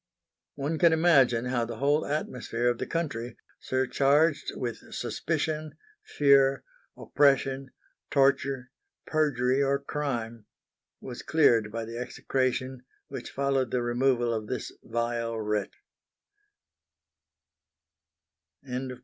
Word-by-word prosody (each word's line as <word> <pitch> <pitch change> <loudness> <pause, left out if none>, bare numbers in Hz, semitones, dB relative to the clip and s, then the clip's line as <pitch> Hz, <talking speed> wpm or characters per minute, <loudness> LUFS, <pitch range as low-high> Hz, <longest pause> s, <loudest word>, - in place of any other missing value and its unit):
One 150 +3 -2
can 170 -2 +5
imagine 135 -8 +4
how 125 -1 0
the 115 0 -5
whole 145 +5 +1
atmosphere 125 -5 -1
of 120 - -1
the - - -3
country 125 -8 -3 0.2
surcharged 140 +4 +2
with 120 -2 -3
suspicion, 155 -1 -3 0.3
fear, 140 -1 +3 0.3
oppression, 135 -1 +2 0.4
torture, 135 -2 +1 0.3
perjury 135 -4 +1
or 140 0 +2
crime 120 -6 -4 0.5
was 125 -2 -7
cleared 115 -9 +3
by 115 0 -4
the 115 +1 -6
execration 130 +1 -2 0.3
which - - -6
followed 135 -2 0
the 125 0 -1
removal 120 0 +1
of 110 -1 -3
this 130 - -4
vile 115 0 -2
wretch. 105 -1 -2 2.9
VI. 130 0 -4
130 Hz, 105 wpm, -28 LUFS, 120-140 Hz, 2.9 s, can